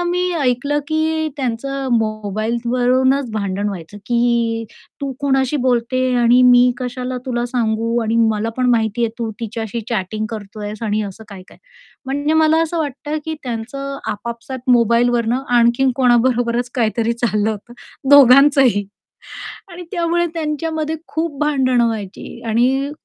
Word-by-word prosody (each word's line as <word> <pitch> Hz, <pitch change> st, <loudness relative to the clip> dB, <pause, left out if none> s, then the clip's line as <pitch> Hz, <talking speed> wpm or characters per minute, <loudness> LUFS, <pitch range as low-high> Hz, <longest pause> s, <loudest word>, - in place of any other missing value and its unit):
आम्ही 355 Hz, +1 st, 0 dB
ऐकलं, 280 Hz, +3 st, 0 dB
की 315 Hz, 0 st, 0 dB
त्यांचं 270 Hz, +1 st, -3 dB
मोबाईल 215 Hz, 0 st, -1 dB
वरूनच 255 Hz, +2 st, +2 dB
भांडण 200 Hz, -1 st, -2 dB
व्हायचं, 195 Hz, 0 st, -8 dB
की 235 Hz, -1 st, +1 dB, 0.4 s
तू 275 Hz, -1 st, -3 dB
कोणाशी 270 Hz, 0 st, +1 dB
बोलते 250 Hz, +1 st, +1 dB, 0.2 s
आणि 245 Hz, +2 st, +5 dB
मी 250 Hz, 0 st, +6 dB
कशाला 250 Hz, 0 st, -4 dB
तुला 240 Hz, -2 st, -1 dB
सांगू 230 Hz, -1 st, -1 dB
आणि 225 Hz, +1 st, 0 dB
मला 215 Hz, +1 st, -1 dB
पण 255 Hz, -1 st, +1 dB
माहितीये, 230 Hz, 0 st, +1 dB
की 220 Hz, -, -15 dB
तू 230 Hz, -2 st, -2 dB
तिच्याशी 225 Hz, 0 st, -4 dB
चॅटिंग 215 Hz, 0 st, -2 dB
करतोयस 210 Hz, 0 st, -7 dB
आणि 215 Hz, -1 st, 0 dB
असं 205 Hz, +2 st, -8 dB
काय-काय 190 Hz, -2 st, -13 dB, 0.5 s
म्हणजे 285 Hz, +3 st, -1 dB
मला 315 Hz, 0 st, +4 dB
असं 330 Hz, +1 st, -2 dB
वाटतं, 295 Hz, 0 st, -3 dB
की 320 Hz, -, -3 dB
त्यांचं 275 Hz, +4 st, -5 dB
आपापसात 235 Hz, +4 st, -5 dB
मोबाईलवरनं 235 Hz, +1 st, +2 dB, 0.2 s
आणखीन 235 Hz, +3 st, +3 dB
कोणाबरोबरच 245 Hz, -1 st, +2 dB
काहीतरी 230 Hz, -1 st, 0 dB
चाललं 220 Hz, -3 st, 0 dB
होतं. 215 Hz, +2 st, -8 dB, 0.4 s
दोघांचंही. 275 Hz, -5 st, +6 dB, 0.9 s
आणि 350 Hz, +1 st, -8 dB
त्यामुळे 345 Hz, -2 st, 0 dB
त्यांच्यामध्ये 315 Hz, 0 st, -2 dB
खूप 320 Hz, -2 st, -3 dB
भांडणं 260 Hz, -5 st, +2 dB
व्हायची 215 Hz, +1 st, -6 dB
आणि 260 Hz, +5 st, +1 dB
245 Hz, 130 wpm, -18 LUFS, 225-275 Hz, 0.9 s, मी